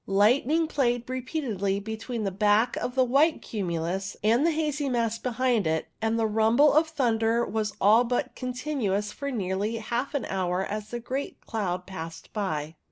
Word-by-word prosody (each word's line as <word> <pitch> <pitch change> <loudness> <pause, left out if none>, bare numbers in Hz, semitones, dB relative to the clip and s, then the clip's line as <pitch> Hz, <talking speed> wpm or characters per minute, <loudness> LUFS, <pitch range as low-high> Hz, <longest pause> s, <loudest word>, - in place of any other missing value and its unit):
Light 210 +7 +4
ning 325 +3 +2
played 245 -6 0
repeatedly 250 - -2
between 220 +2 -4
the 195 - -1
back 210 +4 +3
of 250 - -3
the 260 - +5
white 280 +6 +3
cumulus 190 -1 -3
and 230 +6 +4
the 335 - +4
hazy 300 -3 -1
mass 230 -2 0
behind 245 -5 +1
it, 160 0 -1
and 225 +1 +1
the 225 - +2
rumble 225 +7 +4
of 310 +2 +4
thunder 235 -6 +1
was 215 -1 -2
all 215 +4 +6
but 250 +2 -1
continuous 250 -6 -2
for 280 +4 -5
nearly 205 -2 -1
half 240 +6 -3
an 275 - -1
hour 185 0 -1
as 210 0 -5
the 240 - -4
great 260 +4 -4
cloud 185 -5 -2
passed 165 -3 -8
by. 160 -7 -2
225 Hz, 170 wpm, -27 LUFS, 200-255 Hz, -, all